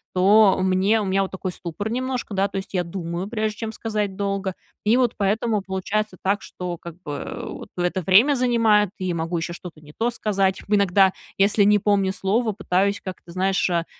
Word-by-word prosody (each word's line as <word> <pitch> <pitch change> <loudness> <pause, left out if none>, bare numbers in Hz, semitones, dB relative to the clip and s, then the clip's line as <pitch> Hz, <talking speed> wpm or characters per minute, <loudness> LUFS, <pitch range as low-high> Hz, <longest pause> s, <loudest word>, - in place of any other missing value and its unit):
то 200 +2 +5
мне 190 +4 +3
у 205 - -2
меня 195 +1 +1
вот 195 - -2
такой 190 0 -4
ступор 180 +5 -5
немножко, 255 -2 -3
да, 195 0 +2
то 200 - -6
есть, 195 - -6
я 180 -2 +1
думаю, 170 +1 -4
прежде 215 -1 -2
чем 225 -1 -3
сказать 210 -3 -3
долго, 195 -1 -2 0.3
и 220 +3 +3
вот 250 -3 +2
поэтому 210 +1 +1
получается 190 +1 -2
так, 200 +2 +1
что 180 -1 -6
как 170 0 -10
бы, 145 - -5
а, - - -6
вот, - - -9
это 180 +1 0
время 205 - +5
занимает, 230 -5 +3
и 185 - -4
я 175 - -1
могу 165 +1 -2
еще 170 +1 -3
что-то 175 -2 -10
не 150 0 -15
то 230 +2 +1
сказать. 195 -5 0
Иногда, 200 -2 +4 0.3
если 200 +1 +4
не 210 +1 +5
помню 195 -1 +1
слово, 215 +4 0
пытаюсь 200 0 0
как-то, 185 -2 -8
знаешь, 190 +1 +1
а, 170 -1 0
195 Hz, 200 wpm, -23 LUFS, 185-215 Hz, 0.3 s, то